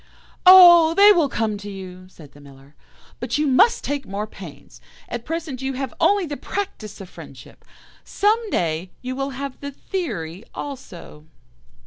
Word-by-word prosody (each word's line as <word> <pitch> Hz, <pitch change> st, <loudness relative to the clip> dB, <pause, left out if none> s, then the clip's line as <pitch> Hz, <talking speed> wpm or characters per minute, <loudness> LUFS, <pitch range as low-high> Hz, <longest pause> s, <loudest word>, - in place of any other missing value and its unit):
"'Oh! 345 Hz, -3 st, +8 dB
they 405 Hz, +1 st, +7 dB
will 335 Hz, -8 st, +2 dB
come 220 Hz, -4 st, -2 dB
to 205 Hz, 0 st, -9 dB
you,' 185 Hz, -2 st, -10 dB
said 155 Hz, -6 st, -16 dB
the 145 Hz, -, -18 dB
Miller, 140 Hz, 0 st, -17 dB, 0.5 s
'but -, -, -3 dB
you 300 Hz, -, 0 dB
must 285 Hz, -, +3 dB
take 285 Hz, -1 st, -3 dB
more 200 Hz, +2 st, -4 dB
pains. 175 Hz, -9 st, -13 dB, 0.3 s
At 240 Hz, 0 st, -6 dB
present 320 Hz, -5 st, -5 dB
you 265 Hz, 0 st, -3 dB
have 265 Hz, -2 st, -5 dB
only 405 Hz, -2 st, +2 dB
the 290 Hz, -3 st, -6 dB
practice 380 Hz, -, -6 dB
of 190 Hz, -, -9 dB
friendship; -, -, -14 dB, 0.4 s
some 435 Hz, +2 st, 0 dB
day 170 Hz, -, -2 dB
you 255 Hz, +1 st, -5 dB
will 270 Hz, +1 st, -3 dB
have 275 Hz, -1 st, -6 dB
the 280 Hz, -, -6 dB
theory 220 Hz, -, -6 dB
also. 185 Hz, -, -9 dB
260 Hz, 160 wpm, -21 LUFS, -, 0.5 s, Oh